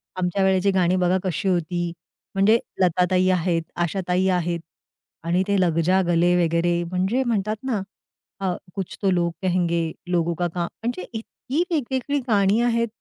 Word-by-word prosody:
आमच्यावेळेची 190 +1 +2
गाणी 185 -1 +2
बघा 185 0 +2
कशी 185 0 -2
होती?" 175 0 -1 0.4
म्हणजे 215 +4 +4 0.2
लताताई 180 +1 +3
आहेत. 175 -2 +1
आशाताई 180 +1 0
आहेत 175 -2 0 0.6
आणि 175 +3 +1
ते 200 -1 +2
लगजा 175 +2 +2
गले 175 +1 +3
वगैरे 170 +1 +1
म्हणजे 190 +9 0
म्हणतात 215 -3 0
ना 235 -7 -1 0.6
अ, 185 - +1 0.2
कुछ 195 -3 -5
तो 195 - +2
लोग 170 -1 +1
कहेंगे 170 -3 0 0.2
लोगों 170 -1 +1
का 175 +2 0
काम 170 -1 -1 0.2
म्हणजे 235 -6 -2
इतकी 250 +7 -3
वेगवेगळी 280 -1 -1
गाणी 205 -1 +3
आहेत 235 -1 +2
185 Hz, 145 wpm, -23 LUFS, 175-200 Hz, 0.6 s, म्हणजे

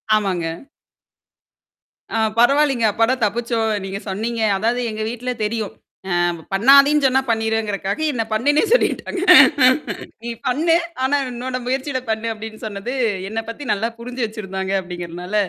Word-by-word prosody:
ஆமாங்க. 190 -5 -1 1.7
ஆ - - 0 0.2
பரவாயில்லங்க. 270 -1 +3
அப்படா 225 +4 +2
தப்பிச்சோம். 230 +1 0
நீங்க 195 +1 -5
சொன்னீங்க. 225 +4 -3 0.2
அதாவது 235 +4 0
எங்க 215 0 -5
வீட்ல 245 +1 -4
தெரியும். 215 -1 -2 0.4
அ 175 - +2 0.4
பண்ணாதீன்னு 280 +6 +6
சொன்னா 265 +1 +2
பண்ணிருவேங்கறக்காக 220 -1 -1
என்ன 230 -3 -1
பண்ணுன்னே 290 - +2
சொல்லிட்டாங்க. 395 -6 +1 1.0
நீ 235 - -5 0.2
பண்ணு. 325 +6 +2 0.3
ஆனா 285 +2 +2
உன்னோட 250 +1 -4
முயற்சியிட 260 +1 -2
பண்ணு, 220 +1 -1
அப்ப்டின்னு 220 0 -9
சொன்னது 210 +4 -5 0.4
என்ன 225 +1 -3
பத்தி 285 +5 -8
நல்லா 220 +3 -1
புரிஞ்சு 245 0 -4
வச்சிருந்தாங்க 190 -3 -5
அப்படிங்கிறனால, 175 +1 -7
230 Hz, 125 wpm, -20 LUFS, 210-255 Hz, 1.7 s, பண்ணாதீன்னு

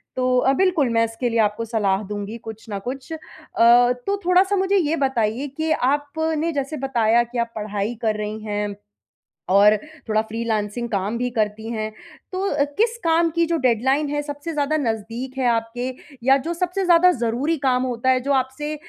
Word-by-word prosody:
तो 255 0 +1
अ, 265 +2 +3
बिल्कुल 335 -4 +2
मैं 230 0 +3
इसके 225 +2 -3
लिए 230 0 0
आपको 215 +1 +1
सलाह 210 -3 0
दूँगी 205 +2 -5
कुछ 225 -1 -10
ना 200 -1 -3
कुछ। 260 - -7
अ, - - -4 0.4
तो 245 +9 +4
थोड़ा-सा 370 +3 +4
मुझे 385 +1 +1
ये 320 -3 +1
बताइए 265 -2 0
कि 315 0 -1
आपने 310 +4 0
जैसे 280 +2 -3
बताया 240 -3 +2
कि 240 +1 -8
आप 235 -1 -1
पढ़ाई 210 +1 -3
कर 220 -2 +1
रही 210 +1 -4
हैं 205 -1 -3 0.7
और 200 +3 +6 0.3
थोड़ा 215 0 +3
फ्रीलांसिंग 220 0 -3
काम 205 +2 -1
भी 250 +1 -1
करती 220 -1 -2
है, 215 -1 -2 0.4
तो 370 -7 0
किस 460 +2 +1
काम 330 0 +3
की 335 0 +3
जो 335 0 0
डेडलाइन 265 +5 +2
है 290 0 -1
सबसे 290 +2 -6
ज़्यादा 300 +1 0
नज़दीक 235 +1 -3
है 260 - 0
आपके? 230 +2 -2 0.4
या 270 +2 +5
जो 320 +5 -3
सबसे 360 +2 -1
ज़्यादा 355 +1 +6
ज़रूरी 255 +4 -1
काम 250 0 +2
होता 250 0 -1
है 260 0 +4
जो 280 +2 0
आपसे 270 +3 -1
250 Hz, 180 wpm, -22 LUFS, 225-300 Hz, 0.7 s, और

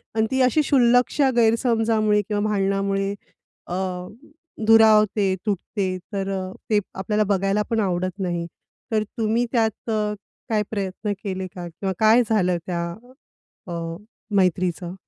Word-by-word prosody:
आणि 220 0 +2
ती 260 0 +2
अशी 255 +4 +3
शुल्लकशा 255 +1 +3
गैरसमजामुळे 225 -2 +2
किंवा 205 +1 -2
भांडणामुळे 195 0 0 0.5
अ, 175 - -5 0.9
दुरावते, 215 -3 +5
तुटते. 195 -1 -2 0.2
तर 195 -1 -2
अ, 185 0 -5 0.2
ते 210 -2 +4
आपल्याला 210 +3 0
बघायला 195 +1 +1
पण 230 - +1
आवडत 185 -1 -1
नाही, 175 -3 -2 0.5
तर 215 -1 +2
तुम्ही 230 +2 +1
त्यात 225 -2 0 0.6
काय 215 -1 +1
प्रयत्न 200 0 -3
केले 190 -2 -3
का 175 -1 -6
किंवा 190 +3 -4
काय 220 +3 +6
झालं 185 -5 +2
त्या 170 -2 -2 0.8
अ, 175 - -5 0.6
मैत्रीचं? 180 -2 +1
205 Hz, 125 wpm, -23 LUFS, 190-225 Hz, 0.9 s, काय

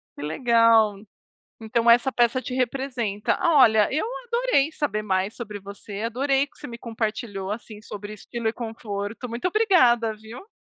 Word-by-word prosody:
Que - - -9
legal. 230 - +4 0.7
Então, 230 +1 +2
essa 245 +3 +5
peça 240 +1 +2
te 255 -1 -6
representa. 250 -5 -1
Olha, 250 - +5
eu 310 +9 0 0.2
adorei 470 - +1
saber 215 -9 -2
mais 190 +1 -1
sobre 210 -4 -7
você, 200 +1 -8
adorei 270 +4 +1
o - - -12
que - - -28
você - - -8
me 235 0 -8
compartilhou, 220 -4 -4
assim, 215 -1 -7
sobre 210 0 -8
estilo 230 +2 -4
e - - 0
conforto, 225 0 -5
muito 235 +9 -3
obrigada, 255 - +3
viu. 230 - -12
230 Hz, 160 wpm, -24 LUFS, 210-255 Hz, 0.7 s, essa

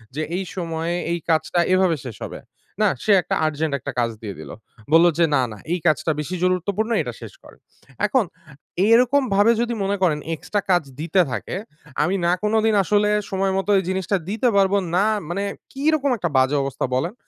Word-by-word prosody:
যে 155 - -2 0.2
এই 195 - -2
সময়ে, 165 -1 -2 0.2
এই 170 - -1
কাজটা, 160 +2 +1
এভাবে 185 -3 +3
শেষ 120 -4 -7
হবে। - - -8 0.4
না, 210 - +5 0.2
সে 215 - +2
একটা - - -2
আর্জেন্ট 155 -1 -1
১ 130 - -17
টা - - -1
কাজ 115 -1 +1
দিয়ে 100 -4 -6
দিল। 75 -2 -9 0.4
বলল 165 +1 +7
যে 170 - +6
"না, 135 - +3
না 105 - -9 0.2
এই 180 - -1
কাজটা 160 0 +2
বেশি 160 +5 -3
গুরুত্বপূর্ণ 185 +5 0
এটা - - -5
শেষ - - -9
করেন।" - - -16 0.5
এখন, 260 -5 +2 0.6
এরকম 250 +4 +5
ভাবে 205 +3 +5
যদি 240 0 -1
মনে 200 +1 0
করেন 155 -5 +2 0.2
এক্সট্রা 205 +6 -3
কাজ 175 -2 +3 0.2
দিতে 170 +4 +2
থাকে, - - -4 0.5
আমি 180 +6 0
না 170 - +3
কোনোদিন 220 +1 +2
আসলে 210 +2 +2 0.2
সময়মত 195 0 -1
এই - - -3
জিনিসটা 190 +1 0
দিতে 220 +4 0
পারব, 195 -1 +3 0.2
না 195 +3 +3 0.2
মানে 195 +3 -2 0.3
কিরকম 285 0 +1
একটা 175 -5 -2
বাজে 130 +2 +3
অবস্থা 135 -1 -2
বলেন? 165 +9 -1
185 Hz, 190 wpm, -22 LUFS, 160-210 Hz, 0.6 s, বলল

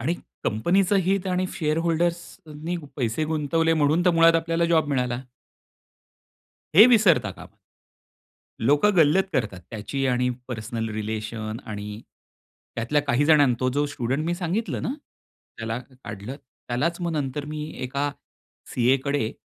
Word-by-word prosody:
आणि 170 - 0 0.3
कंपनीचं 180 - +2
हित 195 +1 0
आणि 185 0 0
शेअर 155 0 0
होल्डर्सनी 170 -1 -2 0.2
पैसे 120 +3 -1
गुंतवले 160 +1 +1
म्हणून 155 +3 +2
तर 180 - +5
मुळात 165 0 +6
आपल्याला 165 +1 0
जॉब 165 -3 +2
मिळाला. 125 -2 -1 1.5
हे 215 +7 +10
विसरता 180 - +4
कामा 95 - -13 1.0
लोकं 145 - +3
गल्लत 165 +4 +5
करतात 110 - -1
त्याची 135 +5 -3
आणि 125 0 +1 0.2
पर्सनल 115 -1 -4
रिलेशन 110 0 -4
आणि 105 0 -6 0.7
त्यातल्या 120 +6 +1
काही 140 0 +1
जणांना 145 -5 +5
तो 130 - +2
जो 145 +1 +1
स्टुडंट 140 +1 -2
मी 175 - 0
सांगितलं 190 +6 -2
ना, - - -2 0.7
त्याला 115 +1 -3
काढलं. 125 -2 -9 0.3
त्यालाच 160 +9 -1
मग 170 -1 -2
नंतर 145 -1 -2
मी 150 0 -5 0.2
एका 140 +3 -1 0.6
सी.ए. 125 +2 +4
कडे 140 -6 0
145 Hz, 135 wpm, -24 LUFS, 120-165 Hz, 1.5 s, हे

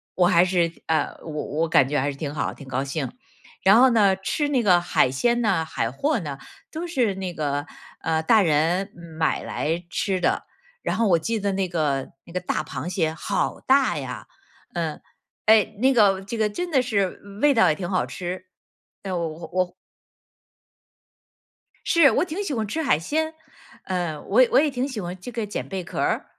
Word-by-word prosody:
我 180 - +4
还 170 0 +5
是 175 -2 +1 0.2
呃， 160 -1 0
我 - - -9
我 150 +2 -2
感 135 -4 +5
觉 145 +1 0
还 140 +2 0
是 140 - -10
挺 145 0 -4
好， 150 - -2
挺 140 - -12
高 130 +1 -1
兴。 140 0 -3 0.5
然 200 +4 +6
后 260 0 +6
呢， 205 -4 +4
吃 195 +10 -1
那 260 -4 +1
个 180 -4 +5
海 130 -6 +2
鲜 235 - +1
呢、 195 -7 +2
海 115 -6 -2
货 285 - 0
呢， 145 -6 -6 0.3
都 335 +2 -4
是 245 - +1
那 190 -2 -4
个 145 -2 -2 0.3
呃 160 0 0
大 215 +6 +5
人 170 +4 +2 0.3
买 160 - +1
来 165 +3 -2
吃 190 -2 0
的， 175 - 0 0.4
然 - - -2
后 230 - +2
我 170 -2 +4
记 225 +7 -2
得 200 0 0
那 190 -1 -1
个 145 -6 -1 0.2
那 170 - -14
个 180 - 0
大 180 - -2
螃 175 - -5
蟹 165 -4 0
好 190 +5 -2
大 270 0 +3
呀。 - - -6 0.5
嗯， 165 -3 -3 0.5
哎， 215 -1 +5
那 265 +3 +4
个 200 -5 +4
这 200 +4 -6
个 215 -1 +2
真 350 +12 -4
的 265 -4 +4
是 200 -7 -1 0.2
味 295 -1 +5
道 225 - +5
也 155 - +2
挺 175 +1 -5
好 185 -2 +1
吃， 180 +1 -6 0.6
呃， 190 -2 -3
我 170 -1 -1
我 160 +2 -8
我 180 -1 0 2.1
是， 330 -6 +5
我 - - +2
挺 370 +4 -4
喜 370 - -3
欢 220 -4 -1
吃 320 +10 -2
海 270 - +3
鲜， 315 - -1 0.5
呃， 175 -5 -2
我 225 +6 +3
也 255 - +5
我 - - +6
也 300 +1 +3
挺 260 0 -2
喜 245 -7 -5
欢 180 +1 -5
这 245 - -8
个 230 -2 -3
捡 205 - -5
贝 190 -2 -4
壳 - - -6
儿。 - - 0
185 Hz, 215 characters per minute, -24 LUFS, 160-230 Hz, 2.1 s, 然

